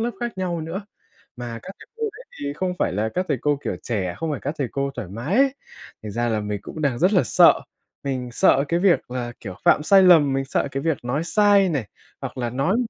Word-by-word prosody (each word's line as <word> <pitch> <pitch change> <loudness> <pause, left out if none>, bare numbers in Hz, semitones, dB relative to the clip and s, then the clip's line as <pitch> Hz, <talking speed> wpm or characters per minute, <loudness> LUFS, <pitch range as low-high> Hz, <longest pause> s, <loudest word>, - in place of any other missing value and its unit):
lớp 235 +2 0
khác 240 -5 -4
nhau 175 -3 -2
nữa, 165 +6 -5 0.5
mà 120 -2 -6
các 190 - -8
thầy - - -13
cô 455 - -8
đấy 480 +4 -13 0.2
thì 140 0 -3
không 180 +4 -1
phải - - +1
là 105 +4 0
các 185 +1 0
thầy 130 - 0
cô, 145 -1 +1
kiểu, - - -2
trẻ, 95 -7 -2
không 165 -1 -2
phải 145 - -3
các 145 +3 -3
thầy 135 -4 -1
cô 140 0 -1
thoải 110 -8 -6
mái 120 - -3
ấy. 275 0 +4 0.5
Thành 105 -2 -6
ra 120 +2 0
là 110 -2 0
mình 105 -1 -4
cũng 155 - -7
đang 135 -5 +1
rất 180 +6 +3
là 185 - +4
sợ. - - +5 0.4
Mình 130 -3 -3
sợ 135 +3 +4
cái 170 +1 +1
việc 180 -9 +2
là, 125 -1 -4
kiểu, 95 -4 -7
phạm - - +5
sai 195 +4 +6
lầm, 160 -6 +6
mình 135 0 0
sợ 135 - -1
cái 135 0 -3
việc 160 -5 -1
nói 140 +7 -1
sai 200 0 +4
này, 135 -10 -2 0.3
hoặc - - -6
là 120 -1 -2
nói 135 - +1
140 Hz, 250 wpm, -23 LUFS, 120-180 Hz, 0.5 s, sai